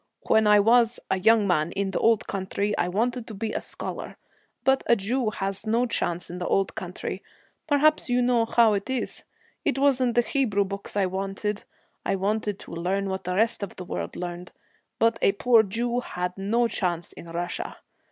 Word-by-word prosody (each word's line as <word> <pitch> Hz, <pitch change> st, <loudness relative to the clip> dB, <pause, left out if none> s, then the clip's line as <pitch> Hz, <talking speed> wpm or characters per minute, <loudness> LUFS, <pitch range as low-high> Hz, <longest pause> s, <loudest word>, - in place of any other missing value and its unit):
When 220 Hz, -1 st, +4 dB
I 210 Hz, 0 st, +7 dB
was 230 Hz, +2 st, +4 dB
a 190 Hz, -, +2 dB
young 220 Hz, +2 st, +5 dB
man, 170 Hz, -2 st, +1 dB
in 195 Hz, -1 st, -1 dB
the -, -, -1 dB
old 225 Hz, -2 st, +3 dB
country, 200 Hz, +2 st, -2 dB
I 175 Hz, -, 0 dB
wanted 230 Hz, +5 st, -1 dB
to 220 Hz, -, -7 dB
be 215 Hz, +2 st, -3 dB
a -, -, -2 dB
scholar. -, -, -7 dB, 0.5 s
But 265 Hz, +1 st, +3 dB
a 235 Hz, -, +6 dB
Jew 230 Hz, +3 st, 0 dB
has 195 Hz, +1 st, -4 dB
no 230 Hz, +3 st, +2 dB
chance 175 Hz, -7 st, -2 dB
in 175 Hz, +1 st, -7 dB
the 180 Hz, -, -3 dB
old 195 Hz, 0 st, +1 dB
country; -, -, -5 dB, 0.5 s
perhaps 305 Hz, -1 st, +3 dB
you 245 Hz, 0 st, +2 dB
know 240 Hz, -2 st, +3 dB
how 230 Hz, -1 st, +4 dB
it 200 Hz, +3 st, -2 dB
is. 260 Hz, -1 st, -2 dB, 0.4 s
It 285 Hz, -, 0 dB
wasn't 260 Hz, -3 st, +2 dB
the 240 Hz, -, +6 dB
Hebrew 230 Hz, -7 st, +1 dB
books 200 Hz, +1 st, -6 dB
I 200 Hz, -, +3 dB
wanted. 195 Hz, +2 st, -3 dB, 0.4 s
I 195 Hz, -, 0 dB
wanted 205 Hz, +1 st, -1 dB
to -, -, -11 dB
learn 190 Hz, +4 st, -1 dB
what 190 Hz, -1 st, -4 dB
the 180 Hz, 0 st, -1 dB
rest 225 Hz, +3 st, +2 dB
of 200 Hz, -, -5 dB
the 180 Hz, -, -7 dB
world -, -, -4 dB
learned, 175 Hz, 0 st, -6 dB, 0.4 s
but 230 Hz, 0 st, +2 dB
a 195 Hz, -, +4 dB
poor 230 Hz, +2 st, +5 dB
Jew 235 Hz, +4 st, -1 dB
had 180 Hz, -6 st, -4 dB
no 225 Hz, +5 st, +1 dB
chance 175 Hz, -6 st, -2 dB
in -, -, -11 dB
Russia. 175 Hz, -, -4 dB
210 Hz, 195 wpm, -26 LUFS, 190-235 Hz, 0.5 s, I